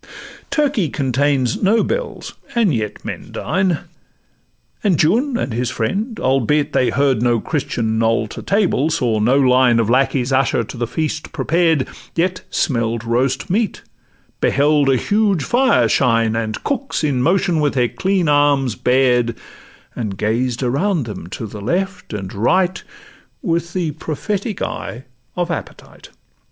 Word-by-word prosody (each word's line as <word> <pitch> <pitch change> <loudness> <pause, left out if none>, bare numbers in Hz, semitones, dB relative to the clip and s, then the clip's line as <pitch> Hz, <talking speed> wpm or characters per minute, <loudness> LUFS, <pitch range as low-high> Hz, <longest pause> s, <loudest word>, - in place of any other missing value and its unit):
Turkey 275 - +1
contains 135 -2 0
no 215 +3 +3
bells, - - -4 0.2
and 220 -9 +3
yet 105 -3 -3
men - - -6
dine; 185 -2 0 1.0
And 190 -7 +2
Juan 235 - +2
and 130 - -3
his 120 +1 -1
friend, 205 - -2
albeit 135 +3 +1
they 125 - +2
heard 135 -4 +1
No 120 -1 +2
Christian 110 -5 -2
knoll 115 0 +2
to - - -7
table, 195 -7 +1
saw 125 -9 0
no 120 +6 +3
line 125 -2 +4
Of 115 -1 +1
lackeys 130 0 +1
usher 130 -3 +2
to 110 - -9
the 120 -1 -2
feast 155 +3 -3
prepared, 165 -4 +1 0.3
Yet 180 +2 0
smelt 115 -5 -1
roast 125 +3 0
meat, 215 +2 -1 0.6
beheld 145 0 +3
a 135 - +4
huge 205 - +1
fire 240 - +3
shine, 115 -1 +2
And 110 -2 -3
cooks 275 - -2
in 140 -4 +1
motion 175 +2 +2
with 145 -2 +1
their 125 -2 +2
clean 190 -3 0
arms 145 -4 +3
bared, 125 -1 +2 0.6
And 105 -5 -4
gazed 115 +5 -1
around 145 +5 0
them 105 -6 -7
to 105 +4 -6
the 105 -1 -8
left 180 - -2
and 95 -3 -5
right 180 - +1 0.6
With 170 -3 -1
the 175 -4 -1
prophetic 195 - -3
eye 120 +3 -5 0.3
of 175 -1 -1
appetite. 165 - -8
140 Hz, 145 wpm, -19 LUFS, 120-180 Hz, 1.0 s, line